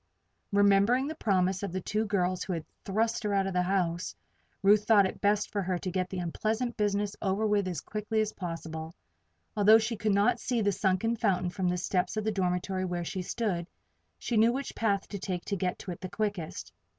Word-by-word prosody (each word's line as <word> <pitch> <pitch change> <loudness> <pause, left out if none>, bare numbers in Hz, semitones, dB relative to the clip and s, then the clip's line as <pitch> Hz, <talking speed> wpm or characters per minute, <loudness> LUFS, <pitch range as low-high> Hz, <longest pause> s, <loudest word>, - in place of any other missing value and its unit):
Remembering 200 +5 +4
the 310 - -3
promise 190 - +1
of 200 -3 -3
the 185 - -2
two 215 +4 -1
girls 185 -2 0
who 190 - -3
had 165 -2 -4 0.2
thrust 220 +3 0
her 210 -2 0
out 195 -1 +2
of 195 - -2
the 180 - +2
house, 180 -2 -1 0.5
Ruth 205 +1 +5
thought 210 -3 +6
it 190 - -4
best 205 0 +2
for 205 - -1
her 185 -1 -1
to 185 +1 -4
get 185 0 -1
the 190 - -5
unpleasant 220 +7 -1
business 205 -1 0
over 210 +2 +1
as 185 -6 -2
quickly 215 +1 -2
as 215 0 0
possible. 165 -2 -6 0.6
Although 210 +1 +7
she 225 +1 -1
could 205 -1 +1
not 230 +4 +3
see 245 -1 -1
the 205 -2 +2
sunken 200 +4 +1
fountain 180 -4 +1
from 185 0 -1
the 180 - 0
steps 180 +3 -1
of 215 - 0
the 220 - 0
dormitory 185 -1 -1
where 175 -2 -2
she 185 +2 -3
stood, 180 -3 -2 0.5
she 235 - -2
knew 225 +2 +5
which 270 +3 -4
path 200 -3 0
to 200 - -5
take 180 -2 -4
to 200 - -1
get 180 -1 -1
to 185 - -7
it 175 - -8
the 185 - -5
quickest. 205 -7 -3
200 Hz, 210 wpm, -29 LUFS, 180-215 Hz, 0.6 s, Although